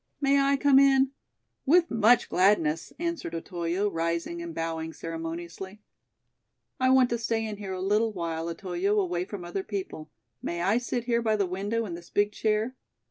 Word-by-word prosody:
"May 280 Hz, 0 st, +3 dB
I 275 Hz, 0 st, +3 dB
come 275 Hz, -1 st, +5 dB
in?" 270 Hz, -1 st, +4 dB, 0.5 s
"With 340 Hz, +4 st, +4 dB
much 230 Hz, +1 st, +4 dB
gladness," 170 Hz, -4 st, +2 dB
answered 335 Hz, -, -3 dB
Otoyo, 175 Hz, +3 st, -2 dB
rising 170 Hz, -, -2 dB
and 340 Hz, 0 st, -6 dB
bowing 160 Hz, 0 st, -3 dB
ceremoniously. 165 Hz, +5 st, -6 dB, 1.0 s
"I 255 Hz, 0 st, +3 dB
want 260 Hz, -2 st, +5 dB
to 235 Hz, -, 0 dB
stay 225 Hz, 0 st, -1 dB
in 215 Hz, -1 st, -5 dB
here 195 Hz, -2 st, -5 dB
a 185 Hz, -, -4 dB
little 210 Hz, +3 st, +2 dB
while, 170 Hz, -3 st, -3 dB
Otoyo, 185 Hz, +4 st, -1 dB
away 180 Hz, -2 st, -1 dB
from 190 Hz, -3 st, -7 dB
other 175 Hz, +3 st, -3 dB
people. 190 Hz, -6 st, -6 dB, 0.3 s
May 170 Hz, 0 st, -3 dB
I 205 Hz, +6 st, +3 dB
sit 245 Hz, -1 st, -3 dB
here 235 Hz, -1 st, +1 dB
by 220 Hz, -2 st, +1 dB
the 200 Hz, -2 st, +1 dB
window 200 Hz, +5 st, -2 dB
in 185 Hz, -, -6 dB
this 170 Hz, 0 st, -9 dB
big 205 Hz, 0 st, +1 dB
chair? 215 Hz, +4 st, 0 dB
205 Hz, 175 wpm, -27 LUFS, 170-235 Hz, 1.0 s, come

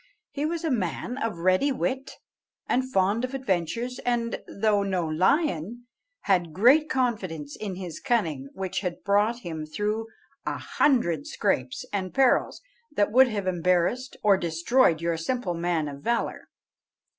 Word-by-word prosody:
He 290 Hz, +1 st, -1 dB
was 335 Hz, +1 st, -3 dB
a 320 Hz, -, 0 dB
man 225 Hz, -, -2 dB
of 225 Hz, -7 st, -2 dB
ready 185 Hz, +11 st, +2 dB
wit, 265 Hz, +1 st, -2 dB, 0.5 s
and 260 Hz, +1 st, 0 dB
fond 200 Hz, +4 st, +2 dB
of 255 Hz, +1 st, -3 dB
adventures, 235 Hz, +2 st, -2 dB
and, 235 Hz, -1 st, -1 dB
though 205 Hz, 0 st, +1 dB
no 190 Hz, -3 st, -1 dB
lion, 195 Hz, -, +1 dB, 0.4 s
had 175 Hz, -5 st, +1 dB
great 265 Hz, -, +5 dB
confidence 185 Hz, -, -2 dB
in 200 Hz, -3 st, -5 dB
his 180 Hz, -3 st, -7 dB
cunning, 165 Hz, -, -1 dB
which 190 Hz, -1 st, -3 dB
had 180 Hz, -3 st, -4 dB
brought 210 Hz, +4 st, +2 dB
him 160 Hz, -5 st, -5 dB
through 210 Hz, +7 st, -2 dB, 0.4 s
a -, -, -2 dB
hundred 175 Hz, -, +1 dB
scrapes 125 Hz, 0 st, -1 dB
and 190 Hz, -3 st, -3 dB
perils 270 Hz, -, +2 dB, 0.3 s
that 210 Hz, -7 st, +1 dB
would 260 Hz, +3 st, +7 dB
have 205 Hz, -5 st, -3 dB
embarrassed 185 Hz, +8 st, 0 dB
or 200 Hz, -2 st, +5 dB
destroyed 170 Hz, +2 st, +2 dB
your 170 Hz, -1 st, 0 dB
simple 180 Hz, +3 st, -2 dB
man 170 Hz, -2 st, -1 dB
of 140 Hz, -1 st, -8 dB
valour. 235 Hz, +5 st, -1 dB
200 Hz, 145 wpm, -26 LUFS, 170-245 Hz, 0.5 s, would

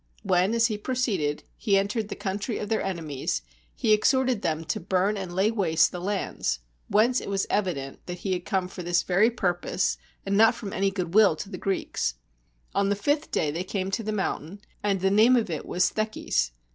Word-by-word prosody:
When, 185 Hz, +4 st, +2 dB
as 230 Hz, 0 st, +4 dB
he 215 Hz, -3 st, -1 dB
proceeded, 205 Hz, -, -1 dB
he 200 Hz, -3 st, +2 dB
entered 205 Hz, +2 st, 0 dB
the -, -, -4 dB
country 205 Hz, +4 st, -3 dB
of 210 Hz, -, -4 dB
their 220 Hz, -, +1 dB
enemies, 155 Hz, -, -3 dB, 0.3 s
he 215 Hz, -, +3 dB
exhorted 255 Hz, +1 st, +2 dB
them 160 Hz, 0 st, -1 dB
to -, -, -2 dB
burn 190 Hz, +3 st, +1 dB
and 190 Hz, -3 st, -5 dB
lay 195 Hz, +4 st, +3 dB
waste 165 Hz, -8 st, +3 dB
the 180 Hz, -, -6 dB
lands; 195 Hz, -, -1 dB, 0.3 s
whence 230 Hz, +5 st, +3 dB
it -, -, -6 dB
was 195 Hz, -1 st, 0 dB
evident 170 Hz, -10 st, -2 dB
that 180 Hz, 0 st, -4 dB
he 190 Hz, -, +1 dB
had 180 Hz, -1 st, -3 dB
come 190 Hz, -2 st, -1 dB
for 185 Hz, 0 st, -8 dB
this 175 Hz, 0 st, +1 dB
very 190 Hz, +5 st, +4 dB
purpose, 185 Hz, -5 st, -1 dB, 0.3 s
and 200 Hz, 0 st, 0 dB
not 225 Hz, +2 st, +6 dB
from 200 Hz, -4 st, -6 dB
any 195 Hz, 0 st, +2 dB
good 180 Hz, -3 st, -4 dB
will 205 Hz, -5 st, +6 dB
to 175 Hz, +6 st, -7 dB
the -, -, -4 dB
Greeks. 190 Hz, -, -1 dB, 0.6 s
On 200 Hz, 0 st, +2 dB
the 200 Hz, -, +2 dB
fifth 290 Hz, +9 st, 0 dB
day 150 Hz, -, 0 dB
they 170 Hz, +4 st, -3 dB
came 190 Hz, 0 st, -3 dB
to 225 Hz, -, -1 dB
the 215 Hz, 0 st, -3 dB
mountain; 195 Hz, -2 st, -3 dB, 0.2 s
and 200 Hz, -3 st, 0 dB
the 190 Hz, 0 st, +2 dB
name 220 Hz, +5 st, +6 dB
of 220 Hz, -7 st, +1 dB
it 155 Hz, -, -4 dB
was 180 Hz, +1 st, +2 dB
Theches. 215 Hz, -, 0 dB
195 Hz, 210 wpm, -26 LUFS, 180-215 Hz, 0.6 s, not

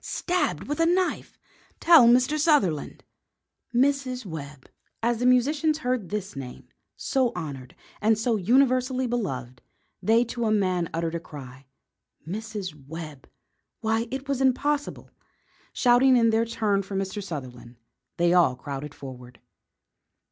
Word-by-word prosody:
Stabbed 360 Hz, 0 st, -1 dB
with 295 Hz, +2 st, -3 dB
a 330 Hz, -, +4 dB
knife! 365 Hz, +1 st, 0 dB, 0.4 s
Tell 325 Hz, -8 st, +7 dB
Mr. 255 Hz, +5 st, +4 dB
Sutherland!" 250 Hz, -, +1 dB, 0.7 s
Mrs. 255 Hz, -1 st, 0 dB
Webb! 145 Hz, -5 st, -8 dB, 0.4 s
As 235 Hz, 0 st, +1 dB
the 245 Hz, -, +2 dB
musicians 295 Hz, +5 st, +2 dB
heard 250 Hz, -, -2 dB
this 205 Hz, -4 st, -4 dB
name, 130 Hz, -2 st, -9 dB, 0.3 s
so 260 Hz, -3 st, 0 dB
honoured 135 Hz, -5 st, -7 dB, 0.3 s
and 220 Hz, +1 st, +3 dB
so 225 Hz, +1 st, 0 dB
universally 255 Hz, +4 st, +2 dB
beloved, 130 Hz, -, -4 dB, 0.4 s
they 225 Hz, +2 st, +4 dB
to 235 Hz, 0 st, -4 dB
a 215 Hz, -, +1 dB
man 185 Hz, -5 st, +1 dB
uttered 165 Hz, 0 st, -2 dB
a 170 Hz, -, -2 dB
cry. 135 Hz, -4 st, -11 dB, 0.6 s
Mrs. 190 Hz, -7 st, -6 dB
Webb! 155 Hz, -3 st, -9 dB, 0.5 s
Why, 225 Hz, +1 st, 0 dB
it 265 Hz, +2 st, -5 dB
was 275 Hz, -1 st, -1 dB
impossible. 285 Hz, +3 st, 0 dB, 0.6 s
Shouting 250 Hz, +1 st, +4 dB
in 230 Hz, -1 st, +4 dB
their 225 Hz, +1 st, +2 dB
turn 215 Hz, -3 st, 0 dB
for 195 Hz, 0 st, -7 dB
Mr. 195 Hz, +1 st, -3 dB
Sutherland, 125 Hz, -8 st, -8 dB, 0.4 s
they 175 Hz, 0 st, +3 dB
all 170 Hz, -8 st, +4 dB
crowded 140 Hz, +2 st, -7 dB
forward. 125 Hz, -3 st, -11 dB
220 Hz, 135 wpm, -25 LUFS, 160-255 Hz, 0.7 s, Tell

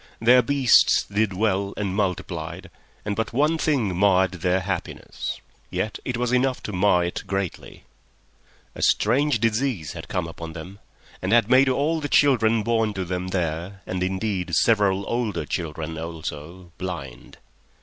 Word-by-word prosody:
Their 125 Hz, +3 st, +6 dB
beasts 135 Hz, 0 st, +4 dB
did 105 Hz, 0 st, 0 dB
well 100 Hz, 0 st, 0 dB
and 100 Hz, -3 st, -2 dB
multiplied, 90 Hz, -2 st, -3 dB, 0.3 s
and 105 Hz, -1 st, -2 dB
but 110 Hz, +2 st, -2 dB
one 150 Hz, +5 st, +2 dB
thing 125 Hz, -, +1 dB
marred 95 Hz, 0 st, +3 dB
their 90 Hz, +1 st, +2 dB
happiness. 95 Hz, -1 st, -5 dB, 0.3 s
Yet 95 Hz, +4 st, -3 dB
it 125 Hz, -2 st, -3 dB
was 125 Hz, 0 st, -1 dB
enough 125 Hz, +1 st, +1 dB
to 105 Hz, -, -5 dB
mar 90 Hz, -2 st, +3 dB
it 85 Hz, -, -3 dB
greatly. 95 Hz, -1 st, -4 dB, 0.9 s
A -, -, -9 dB
strange 130 Hz, +3 st, +2 dB
disease 115 Hz, -, 0 dB
had 80 Hz, -2 st, -8 dB
come 90 Hz, -5 st, -2 dB
upon 85 Hz, 0 st, -8 dB
them 90 Hz, +5 st, -9 dB, 0.4 s
and 95 Hz, -, -2 dB
had 115 Hz, 0 st, +4 dB
made 130 Hz, +1 st, +6 dB
all 150 Hz, +5 st, +1 dB
the 145 Hz, -, -3 dB
children 115 Hz, -6 st, +3 dB
born 115 Hz, -2 st, 0 dB
to 95 Hz, -1 st, -2 dB
them 90 Hz, +1 st, -3 dB
there—and, 90 Hz, +1 st, -3 dB
indeed, 95 Hz, -2 st, -1 dB
several 100 Hz, -1 st, +2 dB
older 120 Hz, -4 st, -2 dB
children 80 Hz, -1 st, -4 dB
also—blind. 85 Hz, +2 st, -7 dB
100 Hz, 145 wpm, -24 LUFS, 90-115 Hz, 0.9 s, Their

